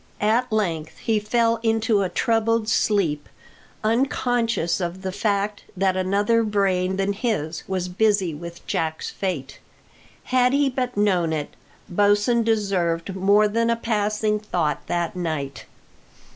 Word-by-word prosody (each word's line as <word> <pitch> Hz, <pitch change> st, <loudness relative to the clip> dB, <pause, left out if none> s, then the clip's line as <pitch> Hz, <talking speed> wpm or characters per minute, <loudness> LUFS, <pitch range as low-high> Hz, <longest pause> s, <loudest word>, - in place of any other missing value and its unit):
At 225 Hz, +4 st, +1 dB
length 170 Hz, -8 st, -1 dB
he 220 Hz, -2 st, 0 dB
fell 230 Hz, +2 st, +1 dB
into 225 Hz, -2 st, +2 dB
a 190 Hz, -, 0 dB
troubled 230 Hz, +2 st, +1 dB
sleep, 190 Hz, -9 st, +1 dB, 0.5 s
unconscious 230 Hz, -5 st, +1 dB
of 175 Hz, +2 st, -4 dB
the 190 Hz, -, -2 dB
fact 205 Hz, +1 st, -1 dB
that 190 Hz, 0 st, +2 dB
another 200 Hz, +5 st, +2 dB
brain 195 Hz, -3 st, +1 dB
than 195 Hz, +1 st, 0 dB
his 195 Hz, -8 st, -2 dB
was 185 Hz, -1 st, -2 dB
busy 195 Hz, -2 st, +1 dB
with 170 Hz, +3 st, -9 dB
Jack's 160 Hz, -1 st, -2 dB
fate. 155 Hz, -9 st, -4 dB, 0.6 s
Had 250 Hz, 0 st, +2 dB
he 280 Hz, -1 st, +2 dB
but 250 Hz, -3 st, -3 dB
known 185 Hz, -5 st, +2 dB
it, 150 Hz, -2 st, -4 dB, 0.3 s
Bosin 205 Hz, +5 st, +3 dB
deserved 195 Hz, -5 st, 0 dB
more 200 Hz, +3 st, +4 dB
than 230 Hz, +2 st, 0 dB
a 235 Hz, -, +3 dB
passing 210 Hz, -1 st, 0 dB
thought 180 Hz, -7 st, -2 dB
that 175 Hz, 0 st, -1 dB
night. 155 Hz, -6 st, -4 dB
205 Hz, 130 wpm, -23 LUFS, 180-225 Hz, 0.6 s, more